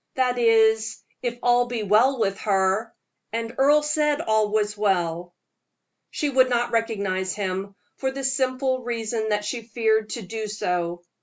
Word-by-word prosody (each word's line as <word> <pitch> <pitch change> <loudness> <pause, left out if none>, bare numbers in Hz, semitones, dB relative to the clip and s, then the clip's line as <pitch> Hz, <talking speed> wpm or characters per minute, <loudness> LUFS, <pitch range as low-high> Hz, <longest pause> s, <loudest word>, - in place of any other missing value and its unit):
that 250 -1 +1
is, 220 -1 +3 0.2
if 240 -1 -3
all 245 0 +3
be 240 -3 -3
well 225 +7 +4
with 195 -3 +1
her; 195 +2 +1 0.4
and 230 +1 -3
Earle 295 +2 +5
said 300 -1 +1
all 220 -7 +1
was 210 0 0
well." 175 -4 -1 0.7
She 300 - -2
would 260 -2 +3
not 240 0 0
recognize 200 -5 -1
him, 195 0 -3 0.2
for 265 - -1
the 270 +1 -6
simple 260 -1 0
reason 230 -2 -3
that 210 0 0
she 230 +3 -3
feared 220 -1 0
to 235 - -5
do 220 +3 -5
so. 175 -4 -2
225 Hz, 155 wpm, -24 LUFS, 205-245 Hz, 0.7 s, Earle